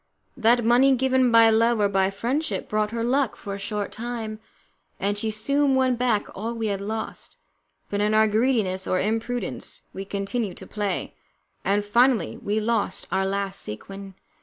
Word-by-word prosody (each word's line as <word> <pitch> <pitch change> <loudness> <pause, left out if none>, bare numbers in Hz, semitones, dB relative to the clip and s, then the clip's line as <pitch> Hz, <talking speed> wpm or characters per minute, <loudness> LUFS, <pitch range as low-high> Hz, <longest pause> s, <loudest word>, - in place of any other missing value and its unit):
That 240 -1 +3
money 255 +3 +5
given 260 -1 +2
by 230 -1 +7
love 230 +1 +3
or 205 - +4
by 195 -1 +2
friendship 250 +11 -2
brought 215 0 0
her 230 +1 -3
luck 260 0 +1
for 200 - -7
a 200 - -5
short 205 0 -3
time, 225 -2 -5 0.6
and 205 +1 0
she 220 +2 -2
soon 275 +6 +1
won 260 -1 +3
back 235 -4 +1
all 225 +4 -4
we 225 -2 -2
had 195 - -4
lost, 220 +2 -5 0.5
but 205 0 -2
in 210 +1 +2
our 220 0 +5
greediness 215 -4 +1
or 185 - +1
imprudence 225 +3 -3
we 195 - -5
continued 200 +1 -3
to 190 - -9
play, 205 -2 -3 0.5
and 205 +1 +1
finally 235 -1 +3
we 210 +2 -1
lost 215 -3 -1
our 190 0 +1
last 195 0 -2
sequin. 195 - -8
220 Hz, 170 wpm, -24 LUFS, 200-240 Hz, 0.6 s, by